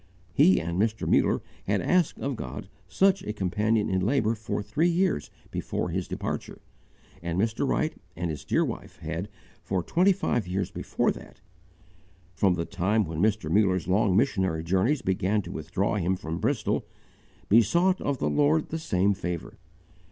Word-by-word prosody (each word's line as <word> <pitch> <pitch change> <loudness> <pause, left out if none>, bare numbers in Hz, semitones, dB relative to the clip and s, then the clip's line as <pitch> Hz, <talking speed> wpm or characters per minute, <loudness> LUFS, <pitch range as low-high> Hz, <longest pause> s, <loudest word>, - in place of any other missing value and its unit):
He 95 - +5
and 85 +3 -1
Mr. 110 0 0
Muller - - +3 0.2
had - - +2
asked 180 -3 +2
of 140 -1 -2
God 65 - -6 0.2
such 195 0 +3
a 105 - -4
companion 105 +2 +1
in 95 -1 0
labour 115 0 +2
for 110 -2 -3
three 150 - +1
years 175 - +1 0.2
before - - -2
his - - -2
departure, - - -4 0.6
and 85 +1 -2
Mr. 115 +6 0
Wright 155 +3 0 0.2
and 85 0 -2
his 75 - -6
dear - - +1
wife - - -7
had, - - -4 0.3
for 95 -3 -2
twenty 185 - +3
five 120 - 0
years 95 +1 -2
before - - 0
that - - -11 0.9
from 95 0 +2
the 85 -1 -2
time 105 +3 +1
when 80 0 -4
Mr. 105 -6 +1
Muller's 95 -3 +2
long 95 0 +3
missionary 95 - +1
tours 95 - +1
began 95 +2 +1
to - - -8
withdraw 90 +7 -1
him 95 0 +1
from 80 -2 -5
Bristol - - 0 0.6
besought 170 - +4
of 140 -2 -1
the - - -1
Lord 150 +2 +2
the 160 - -3
same 100 - +2
favour. 90 -3 -5
100 Hz, 165 wpm, -27 LUFS, 90-125 Hz, 0.9 s, He